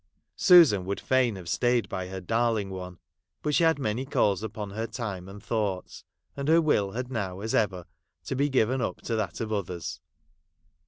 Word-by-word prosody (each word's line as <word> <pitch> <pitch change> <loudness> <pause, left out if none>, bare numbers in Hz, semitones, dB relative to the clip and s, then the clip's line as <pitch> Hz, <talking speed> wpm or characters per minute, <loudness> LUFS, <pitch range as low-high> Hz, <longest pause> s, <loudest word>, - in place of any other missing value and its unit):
Susan 165 - +7
would 100 +2 -3
fain 130 -4 +2
have 90 -3 -9
stayed 120 +5 +1
by 95 -1 -4
her 95 0 -6
darling 110 +1 0
one; 90 -1 -7 0.5
but 150 - 0
she 170 - +3
had 160 -2 +4
many 120 -2 -1
calls 105 -7 +1
upon 105 -2 -5
her 110 +3 -3
time 105 -5 -5
and 100 +1 -11
thoughts, 105 -5 -3 0.3
and 140 0 -4
her 165 +2 +6
will 105 -12 +1
had 125 +2 -4
now, 95 -6 -3
as 110 +1 -3
ever, 95 -5 +1 0.4
to 135 - -3
be 140 +2 +1
given 130 -1 +2
up - - -2
to 115 - -2
that 105 -5 -2
of 110 -2 -3
others. 85 -5 -4
110 Hz, 190 wpm, -27 LUFS, 95-125 Hz, 0.5 s, Susan